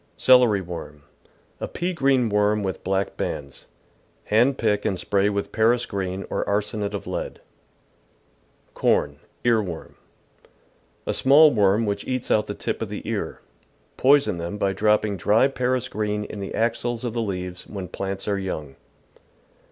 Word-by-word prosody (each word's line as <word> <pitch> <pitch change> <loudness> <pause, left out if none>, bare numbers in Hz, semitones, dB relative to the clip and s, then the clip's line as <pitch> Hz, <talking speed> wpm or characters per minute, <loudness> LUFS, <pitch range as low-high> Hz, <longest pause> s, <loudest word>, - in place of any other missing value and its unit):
Celery 125 -6 +5
Worm. 80 -5 -8 0.3
— - - -36
A - - -2
i)ea 180 +1 -2
green 135 -6 +2
worm 105 0 +2
with 95 -1 -4
black 95 +1 -1
bands. 70 -2 -5 0.6
Hand 120 +6 +3
pick 105 -2 +1
and 95 - 0
spray 100 +2 +1
with 100 -1 -3
Paris 120 +2 +2
green 95 -1 -4
or - - 0
arsenate 105 0 -1
of 100 - -6
lead. - - -4 1.3
Corn. - - +1
— - - -30
Ear^worm. 105 -8 0 0.6
— - - -37
A - - -1
small 145 +3 +6
worm 105 +1 +3
which 100 -1 -3
eats 130 -1 -2
out 105 - +3
the - - -4
tip - - -3
of - - -3
the - - -7
ear. - - -3 0.5
Poison 135 -9 +4
them 85 +4 -4
by 100 -1 0
dropping 105 -1 +2
dry 105 +8 +4
Paris 130 -1 -1
green 105 -2 -2
in 105 - -7
the 100 - -5
axils 120 +1 -1
of 120 -3 -3
the 120 - -1
leaves 90 -4 -4
when 95 -3 -6
j^lants 95 +2 -5
are 100 -1 0
young. 75 -8 -5
105 Hz, 160 wpm, -24 LUFS, 95-120 Hz, 1.3 s, small